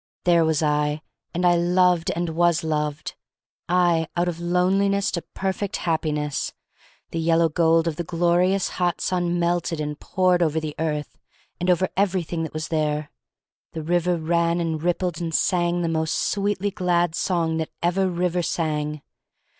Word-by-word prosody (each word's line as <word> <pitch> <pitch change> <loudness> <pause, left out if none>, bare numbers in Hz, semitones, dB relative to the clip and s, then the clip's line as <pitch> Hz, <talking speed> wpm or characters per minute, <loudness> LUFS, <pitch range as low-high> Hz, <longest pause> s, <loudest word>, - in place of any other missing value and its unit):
There 170 -2 +4
was 160 -1 +1
I, 150 +1 0 0.3
and 175 +1 -1
I 175 0 +5
loved 180 0 +3
and 170 0 -1
was 170 0 +2
loved. 150 -1 -2 0.6
I 175 -2 +3
— - - -13
out 175 +1 +2
of 170 -1 -3
loneliness 195 +3 +1
into 170 - -2
perfect 195 +1 -2
Happiness! 150 -3 -1 0.6
The 165 - -2
yellow 165 0 +3
gold 165 +1 +3
of 160 -2 -2
the 175 - -2
glorious 175 +3 +2
hot 175 -1 -1
sun 175 -1 0
melted 170 -1 0
and 150 -1 -4
poured 185 -1 +1
over 160 -1 +2
the 155 -1 -5
earth 150 -2 -3 0.4
and 180 +1 -1
over 180 +1 +3
everything 180 -4 0
that 160 - -4
was 155 0 -4
there. 150 -2 -1 0.6
The 160 - -5
river 175 +2 +1
ran 170 +1 +1
and 160 -2 -2
rippled 175 0 -1
and 165 -2 -2
sang 175 -1 +1
the - - 0
most 160 0 0
sweetly 205 0 0
glad 175 -4 +1
song 165 -2 0
that 160 -1 -2
ever 185 +2 +2
river 180 0 0
sang. 150 -3 -2
170 Hz, 160 wpm, -23 LUFS, 160-180 Hz, 0.6 s, I